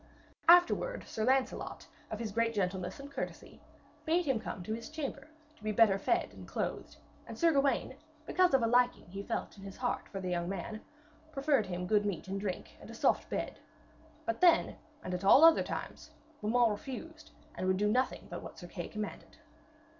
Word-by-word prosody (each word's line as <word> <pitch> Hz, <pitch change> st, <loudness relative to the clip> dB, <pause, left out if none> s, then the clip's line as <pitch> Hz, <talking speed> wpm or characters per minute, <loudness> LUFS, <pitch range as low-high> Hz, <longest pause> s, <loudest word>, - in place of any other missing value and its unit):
Afterwards 355 Hz, +8 st, +5 dB
Sir 220 Hz, -, -2 dB
Lancelot, 260 Hz, +1 st, 0 dB, 0.2 s
of 220 Hz, -, -4 dB
his 220 Hz, -1 st, -4 dB
great 230 Hz, +1 st, 0 dB
gentleness 185 Hz, 0 st, -2 dB
and 280 Hz, +1 st, -9 dB
courtesy, -, -, -6 dB, 0.4 s
bade 335 Hz, +2 st, +2 dB
him 265 Hz, -5 st, +1 dB
come 200 Hz, -4 st, -6 dB
to 215 Hz, -, -3 dB
his 230 Hz, +1 st, -6 dB
chamber, 300 Hz, -2 st, -5 dB, 0.3 s
to 220 Hz, -, -21 dB
be 215 Hz, -, 0 dB
better 205 Hz, -2 st, +4 dB
fed -, -, 0 dB
and -, -, -11 dB
clothed; -, -, -4 dB, 0.3 s
and -, -, -8 dB
Sir 335 Hz, -1 st, +4 dB
Gawaine, 275 Hz, -2 st, +1 dB, 0.3 s
because 365 Hz, -3 st, +3 dB
of 260 Hz, -, +3 dB
a -, -, +4 dB
liking 245 Hz, +1 st, +3 dB
he 195 Hz, +1 st, -5 dB
felt 225 Hz, +3 st, -4 dB
in -, -, -11 dB
his 195 Hz, -1 st, -9 dB
heart 250 Hz, -1 st, -2 dB
for 195 Hz, -, -5 dB
the 185 Hz, -1 st, -3 dB
young 175 Hz, 0 st, -1 dB
man, 195 Hz, +3 st, -5 dB, 0.5 s
proffered 275 Hz, -7 st, +1 dB
him 180 Hz, 0 st, -3 dB
good 205 Hz, +2 st, +2 dB
meat 190 Hz, -2 st, -3 dB
and 195 Hz, +1 st, -3 dB
drink 190 Hz, -3 st, -4 dB
and -, -, -12 dB
a -, -, -8 dB
soft -, -, +1 dB
bed. -, -, -3 dB, 0.7 s
But 340 Hz, -, -2 dB
then, 350 Hz, -2 st, +5 dB, 0.3 s
and 185 Hz, -, -4 dB
at 180 Hz, +1 st, -3 dB
all 270 Hz, +11 st, +8 dB
other 330 Hz, 0 st, +7 dB
times, -, -, -6 dB, 0.3 s
Beaumains 230 Hz, +2 st, +3 dB
refused, 310 Hz, +8 st, -7 dB, 0.2 s
and 185 Hz, -, -3 dB
would 185 Hz, 0 st, +2 dB
do 210 Hz, +2 st, +2 dB
nothing 250 Hz, +5 st, 0 dB
but -, -, -6 dB
what -, -, -10 dB
Sir 175 Hz, -, -9 dB
Kay 175 Hz, -1 st, -6 dB
commanded. 215 Hz, -1 st, -7 dB
225 Hz, 195 wpm, -32 LUFS, 195-275 Hz, 0.7 s, all